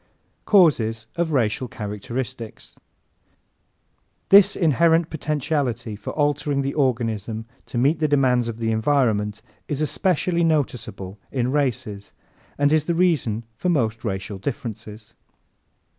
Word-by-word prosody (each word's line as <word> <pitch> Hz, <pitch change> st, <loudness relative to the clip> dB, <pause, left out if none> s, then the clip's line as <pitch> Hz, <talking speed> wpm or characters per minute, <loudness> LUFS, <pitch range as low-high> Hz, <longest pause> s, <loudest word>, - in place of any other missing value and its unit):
Causes 115 Hz, -, +3 dB
of 170 Hz, -1 st, -1 dB
Racial 125 Hz, -2 st, 0 dB
Characteristics 115 Hz, +3 st, -6 dB
¶ -, -, -46 dB, 1.5 s
This 200 Hz, 0 st, +7 dB
inherent 165 Hz, +1 st, +3 dB
potentiality 140 Hz, -7 st, -2 dB
for 105 Hz, -, -8 dB
altering 145 Hz, -1 st, 0 dB
the 140 Hz, -, -2 dB
organism 115 Hz, -5 st, -1 dB, 0.2 s
to -, -, -5 dB
meet 140 Hz, +7 st, +2 dB
the 155 Hz, -, +2 dB
demands 130 Hz, -4 st, +2 dB
of 115 Hz, -1 st, -4 dB
the 115 Hz, -1 st, -1 dB
environment 110 Hz, -3 st, +1 dB, 0.2 s
is 145 Hz, -2 st, -3 dB
especially 170 Hz, +2 st, +1 dB
noticeable 120 Hz, -, -2 dB
in 125 Hz, -1 st, 0 dB
races 115 Hz, -8 st, -2 dB, 0.4 s
and 145 Hz, +1 st, +3 dB
is 155 Hz, -1 st, +2 dB
the 170 Hz, -, 0 dB
reason 150 Hz, -, +1 dB
for 180 Hz, -, -1 dB
most 115 Hz, -8 st, 0 dB
racial 95 Hz, -2 st, -4 dB
differences. 110 Hz, -2 st, -6 dB
130 Hz, 120 wpm, -23 LUFS, 110-150 Hz, 1.5 s, This